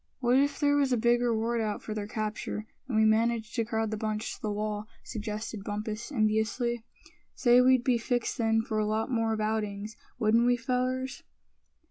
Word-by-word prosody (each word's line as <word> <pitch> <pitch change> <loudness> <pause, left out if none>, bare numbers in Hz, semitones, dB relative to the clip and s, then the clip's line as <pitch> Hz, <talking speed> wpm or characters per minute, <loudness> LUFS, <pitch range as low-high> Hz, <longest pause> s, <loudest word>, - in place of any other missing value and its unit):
"What 250 0 +4
if 285 +1 +1
there 290 -1 +3
was 275 -2 +2
a 250 - +3
big 240 +1 +3
reward 230 0 +1
out 210 -2 -2
for 215 - -4
their 210 -1 -4
capture, 215 0 -3 0.2
and 235 -5 -1
we 220 - +5
managed 225 +1 +2
to 230 - +1
crowd 220 -1 -1
the 215 - -2
bunch 215 0 -2
to - - -12
the 215 - -2
wall?" 210 0 -3 0.2
suggested 215 -1 -5
Bumpus, 215 +4 -4
enviously. 225 0 0 0.5
"Say, 245 -1 +5
we'd 255 -1 +5
be 245 -2 +2
fixed 245 +1 -1
then 225 -1 +2
for 220 -1 -2
a 210 - +1
lot 220 +3 -1
more 225 -2 +1
of 220 - -1
outings, 215 -1 -2 0.2
wouldn't 230 +1 +3
we, 245 0 +4
fellers?" 255 +2 -1
225 Hz, 190 wpm, -29 LUFS, 215-245 Hz, 0.5 s, we